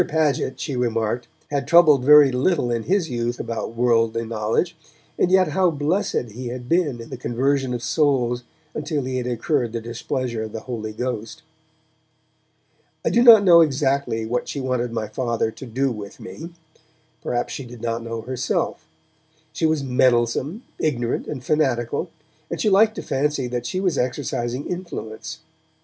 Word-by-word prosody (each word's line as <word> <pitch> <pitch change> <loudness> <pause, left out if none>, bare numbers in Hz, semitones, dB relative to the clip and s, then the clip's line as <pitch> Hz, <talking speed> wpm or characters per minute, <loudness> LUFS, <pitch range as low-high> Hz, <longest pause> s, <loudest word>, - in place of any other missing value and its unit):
Paget, 150 -4 0
she 140 - -3
remarked, 120 -1 -1 0.2
had 140 -1 -1
troubled 155 -6 +6
very 145 0 +8
little 130 0 +1
in 115 -1 0
his 185 -5 +1
youth 120 0 -2
about 115 0 -4
worldly 115 -1 +2
knowledge, 115 +10 -1 0.4
and 180 - +2
yet 185 -2 +4
how 185 +3 +3
blessed 150 - -1
he 125 +4 -6
had 120 0 -6
been 160 -7 +1
in 115 - -10
the 130 - -5
conversion 130 +2 0
of 120 -1 -3
souls 125 -4 +1 0.3
until 150 -1 -2
he 130 0 -3
had 125 -1 -2
incurred 120 0 -1
the 115 - -2
displeasure 120 +1 -3
of 110 -1 -6
the 110 - -5
Holy 110 -4 -5
Ghost! 125 +6 -5 1.6
I - - +2
do 235 - +4
not 230 -4 +9
know 170 -3 +8
exactly 135 -6 +1
what 120 +2 -2
she 140 - -4
wanted 125 -2 -1
my 110 -2 -3
Father 115 0 -1
to 130 - -10
do 130 +4 0
with 105 -1 -8
me; 125 +9 -8 0.7
perhaps 120 0 -2
she 135 - -5
did 120 -1 -11
not 115 0 -1
know 115 0 -5
herself; 125 -6 -2 0.7
she 160 - +1
was 155 -3 0
meddlesome, 130 - +1 0.2
ignorant 120 -6 -1
and 130 -4 -5
fanatical, 130 -6 0 0.4
and - - -4
she 215 - +2
liked 215 +3 +5
to - - -5
fancy 145 -1 0
that 120 -1 -3
she 185 - -2
was 185 -5 0
exercising 125 0 -2
influence. 170 -12 -6
125 Hz, 165 wpm, -22 LUFS, 120-150 Hz, 1.6 s, not